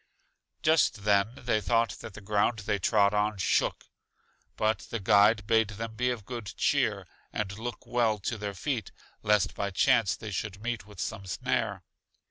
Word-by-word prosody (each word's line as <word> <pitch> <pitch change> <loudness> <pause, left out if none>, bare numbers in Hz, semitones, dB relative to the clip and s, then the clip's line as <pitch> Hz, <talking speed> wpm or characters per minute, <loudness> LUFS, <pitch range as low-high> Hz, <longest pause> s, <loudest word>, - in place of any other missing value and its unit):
Just 155 -9 +3
then 100 0 +3
they 120 -5 0
thought 115 +3 +2
that 105 - -9
the - - -9
ground 105 +2 +1
they 105 -1 0
trod 100 +1 +3
on 105 0 +1
shook. 95 - +1 0.7
But 110 +1 +1
the 115 - -3
guide 105 +2 +4
bade 110 0 +3
them 110 +2 -6
be 125 +3 0
of 115 -5 -4
good 115 -5 -6
cheer, - - +1 0.3
and 100 -2 -3
look 120 +1 -6
well 115 -3 +1
to 105 +3 -4
their 100 -1 -4
feet, 115 0 -3 0.3
lest 105 -1 +2
by 100 - -2
chance 115 +1 +3
they 110 - -7
should 100 +1 -4
meet 115 -4 -3
with 105 -4 -14
some 100 -3 -4
snare. 90 - -1
105 Hz, 170 wpm, -29 LUFS, 100-115 Hz, 0.7 s, guide